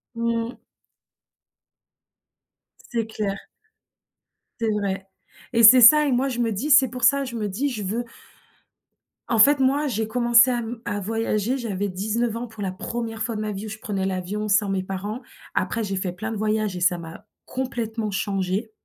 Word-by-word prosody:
Mmh. 230 +1 -2 2.3
C'est 230 -2 -1
clair. 210 -3 -3 1.2
C'est 225 - 0
vrai. 195 -2 -2 0.5
Et 230 0 +3
c'est 245 +4 +10
ça 300 +6 +8
et 285 - 0
moi 255 +2 +1
je 245 -3 -4
me 230 -2 +1
dis 230 +10 -3
c'est 270 -4 +6
pour 250 0 -7
ça, 280 0 +4
je 255 -3 -6
me 215 -2 -2
dis 240 +9 -2
je 220 -6 -5
veux 225 +6 -2 1.2
En 230 - 0
fait, 280 +6 +6
moi 275 +3 +2
j'ai 220 -4 -2
commencé 235 +1 +5
à 245 -1 0
m 235 0 -6
à 205 - -2
voyager, 225 +3 -1
j'avais 205 -5 -3
19 220 +5 -2
ans 240 +1 -4
pour 220 -2 -8
la 190 - -2
1re 225 +3 -5
fois 230 0 -2
de 215 - -3
ma 215 0 -3
vie 200 +1 -6
où - - -6
je 220 - -7
prenais 200 -3 -3
l'avion 190 +3 -3
sans 205 -1 +2
mes 195 -1 0
parents. 200 +5 -5 0.3
Après 230 - -1
j'ai 195 -2 -3
fait 185 -1 -2
plein 220 +5 -6
de 225 - -4
voyages 215 -2 -1
et - - -4
ça 175 0 +3
m'a 165 -1 -10 0.2
complètement 230 -4 -3
changée 195 +2 -2
220 Hz, 185 wpm, -23 LUFS, 200-240 Hz, 2.3 s, c'est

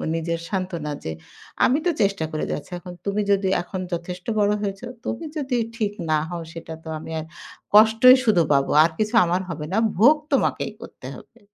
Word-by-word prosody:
নিজের 165 0 -2
সান্ত্বনা 180 -6 -3
যে, 80 - -4 0.5
"আমি 270 +4 +3
তো 350 - +3
চেষ্টা 195 -5 +1
করে 155 - -2
যাচ্ছি। 150 - -5
এখন 180 0 -10
তুমি 200 +1 0
যদি 195 -1 +2
এখন 185 +1 -6
যথেষ্ট 180 +1 -5
বড় 205 0 +3
হয়েছ, 195 -1 -4 0.2
তুমি 235 - -4
যদি 265 -4 -1 0.2
ঠিক 215 -3 -1 0.2
না 155 - +3
হও 175 -1 -5
সেটা 165 -1 -8
তো 160 - -8
আমি 160 - -9
আর 155 - -6 0.5
কষ্টই 225 +4 +8
শুধু 210 -7 +4
পাবো। 140 -1 +2
আর 165 - +1
কিছু 215 +1 -1
আমার 175 +2 0
হবে 150 -2 -5
না। - - +1 0.2
ভোগ 255 +9 +7 0.2
তোমাকেই - - +1
করতে - - -10
হবে।" - - -16
190 Hz, 185 wpm, -23 LUFS, 165-215 Hz, 0.5 s, কষ্টই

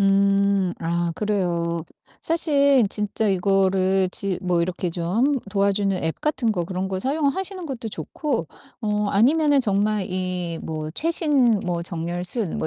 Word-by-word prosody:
음. 195 -1 +2
아 170 0 -1
그래요. 170 -5 -1 0.4
사실 280 -6 +3
진짜 210 +1 0
이거를 190 0 +2
지 195 -2 0
뭐 180 -2 +1
이렇게 180 0 -2
좀 170 0 -4
함 270 +6 +3 0.2
도와주는 200 -1 +1
앱 160 0 -2
같은 275 -6 0
거 180 -5 -1
그런 185 +2 -3
거 190 - -2
사용하시는 320 - -1
것도 240 -6 -5
좋고 205 - -3 0.3
어 210 -2 -1
아니면은 285 +6 +3
정말 205 -2 0
이 180 -2 -2
뭐 155 -1 -4
최신 285 - +3
뭐 175 -2 -2
정렬 175 +1 -4
순 195 -2 -2
뭐 - - -1
195 Hz, 260 characters per minute, -23 LUFS, 180-235 Hz, 0.4 s, 사실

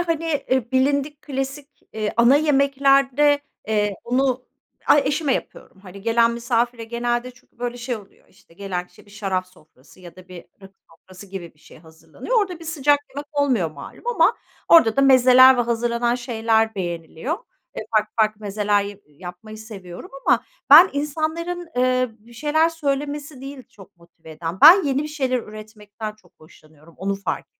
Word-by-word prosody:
hani, 330 -2 -2 0.2
eee, 255 -2 0
bilindik 280 +3 0
klasik, 270 +1 -5 0.2
eee, 215 -1 -3
ana 235 +4 +5
yemeklerde, 280 -1 +3 0.3
eee, 210 -2 0
bunu 255 +1 0 0.4
ay, 295 - +5
eşime 285 -1 0
yapıyorum. 190 - -8
Hani, 195 0 -12
gelen 230 +1 +3
misafire 235 0 -1
genelde 240 +2 -2
çünkü 250 -1 -26
böyle 245 0 -4
şey 240 0 -4
oluyor, 200 -2 -17
işte, 165 - -24
gelen 180 -2 -5
kişi - - -21
bir - - -19
şarap 195 -3 -3
sofrası 155 -4 -22
ya 175 -1 -13
da 185 0 -15
bir 175 -2 -11 0.2
rakı 195 0 -15 0.2
sofrası 185 +4 -15
gibi 185 -4 -9
bir - - -32
şey - - -17
hazırlanıyor. 160 - -4
Orada 370 -4 -3
bir - - -10
sıcak 290 -3 +2
yemek 285 +1 -7
olmuyor 260 - +1
malum 310 - -12
ama 485 - +2 0.3
orada 250 -10 +6
da - - +4
mezeler 260 -1 +7
ve - - +1
hazırlanan 235 0 0
şeyler 225 -2 0
beğeniliyor. 175 - -4 0.4
Eee, - - -4
farklı 215 0 0
farklı 215 0 +1
mezeler 205 0 0
ya 200 0 -7
yapmayı 180 +8 -11
seviyorum 195 -5 -10 0.2
ama - - +3 0.3
ben 330 +6 +10
insanların, 320 +4 -3
eee, 255 0 +2
bir 230 +3 -19
şeyler 305 +6 +1
söylemesi 290 -2 -4
değil, 270 -1 -9
çok 195 -2 -18
motive 170 -1 -18
eden. 165 +3 -6
Ben 335 +4 +9
yeni 275 0 0
bir 305 - -5
şeyler 265 -4 -1
üretmekten 215 -1 -9
çok 185 -4 -27
hoşlanıyorum, 155 0 -20
onu 195 +2 -2
fark 195 0 -4
235 Hz, 165 wpm, -21 LUFS, 200-280 Hz, 0.4 s, ben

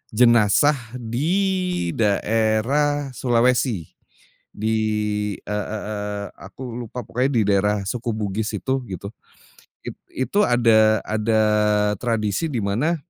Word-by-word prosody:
jenazah 120 +4 +4 0.2
di 175 - -1
daerah 115 +7 +1
Sulawesi. 120 - +1 0.6
Di 110 +1 -1 0.6
e - - -33
e 105 +1 -3
eee, 105 -1 -4
aku 95 +7 -11 0.2
lupa 120 +1 -6
pokoknya 125 +3 0
di 115 - +4
daerah 100 0 +2
suku 120 +2 -4
Bugis 105 +1 -2
itu, 130 0 -2
gitu. 100 +2 -6 0.7
It - - -7 0.3
itu 205 +1 +3
ada 110 -3 +4
ada 110 +1 +1 0.6
tradisi 115 - -1
di 125 - -1
mana 125 +13 0
115 Hz, 110 wpm, -22 LUFS, 105-130 Hz, 0.7 s, jenazah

